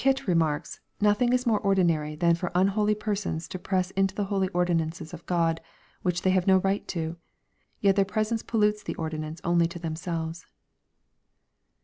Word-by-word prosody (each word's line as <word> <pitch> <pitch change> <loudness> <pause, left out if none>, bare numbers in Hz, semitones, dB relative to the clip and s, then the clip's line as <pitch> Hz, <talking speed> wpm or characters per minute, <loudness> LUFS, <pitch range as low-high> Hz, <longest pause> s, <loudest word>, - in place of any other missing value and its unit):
Burkitt 270 0 +2
remarks, 165 -5 0 0.2
"Nothing 210 +4 +3
is 250 +1 +2
more 225 -3 +3
ordinary 170 -7 +1
than 170 +2 +3
for 175 +1 -2
unholy 205 +3 +3
persons 205 -6 -3
to 185 - -5
press 185 0 -1
into 195 0 0
tlie 205 - -1
holy 195 -1 0
ordinances 170 -2 -1
of 165 - -8
Grod, 165 -2 +1 0.4
which 175 -1 -1
they 185 - +4
"have 185 0 +1
no 190 -1 +7
right 195 +2 0
to. 165 -1 -3 0.6
Yet 195 -1 +4
their 200 - +4
presence 215 +3 -1
pollutes 210 -2 +1
the - - -5
ordinance 155 0 -4
only 170 -2 +3
to 170 - -8
themselves." 165 0 -4
185 Hz, 165 wpm, -27 LUFS, 165-205 Hz, 0.6 s, no